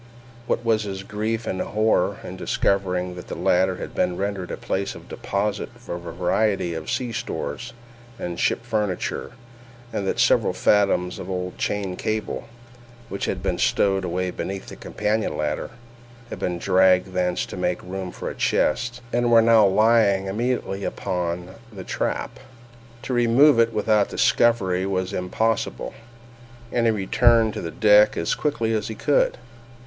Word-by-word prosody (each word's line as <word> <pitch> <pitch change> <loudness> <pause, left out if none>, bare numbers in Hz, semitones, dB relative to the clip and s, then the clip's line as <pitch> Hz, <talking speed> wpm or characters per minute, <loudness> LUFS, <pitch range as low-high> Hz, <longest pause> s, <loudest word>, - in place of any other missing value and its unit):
What 120 - -1
was 110 -2 +3
his 95 -2 -5
grief 110 +3 -3
and 95 - -2
horror 110 +1 +1
in - - -7
discovering 90 -2 0
that 90 0 -9
the - - -5
latter 95 +1 +2
had - - -7
been 90 - 0
rendered 100 -2 -3
a - - -4
place 100 +1 -3
of - - -12
deposit 100 +1 -2
for 120 - -7
a 85 - -4
variety 90 +2 0
of 80 -1 -6
sea 125 -2 -1
stores 115 +1 -4 0.5
and 85 -5 -5
ship 115 - 0
furniture, 105 -1 -2 0.6
and 100 -3 -2
that - - -1
several - - +3
fathoms 100 -3 +2
of 90 - -7
old 90 -1 -4
chain 100 -3 -2
cable, 110 +3 -3 0.6
which 100 - -3
had - - -3
been - - -1
stowed 95 -1 +2
away 90 +1 -2
beneath 95 +1 -5
the - - -9
companion 105 -6 -2
ladder, 75 -1 -2 0.6
had - - -6
been 90 -1 -2
dragged 95 0 +3
thence 90 -1 0
to - - -8
make 90 -1 -1
room 95 0 -5
for - - -7
a - - -3
chest, 120 +9 0
and 120 0 +2
were 115 - +8
now 115 -2 +6
lying 100 -1 +4
immediately 105 -1 -2
upon 90 -2 -3 0.2
the 95 -3 -8
trap! - - -3 0.6
To 130 - -3
remove 120 +3 +5
it 115 0 +4
without 105 -2 +2
discovery 95 -6 +2
was 95 -1 -2
impossible, 110 +5 -1 0.8
and 120 -1 +2
he - - +4
returned 110 +2 +3
on 85 - -6
deck 105 -1 +6
as 85 - 0
quickly 115 -7 -1
as 105 -2 -1
he 110 - -5
could. 145 +6 +2
100 Hz, 160 wpm, -23 LUFS, 90-110 Hz, 0.8 s, were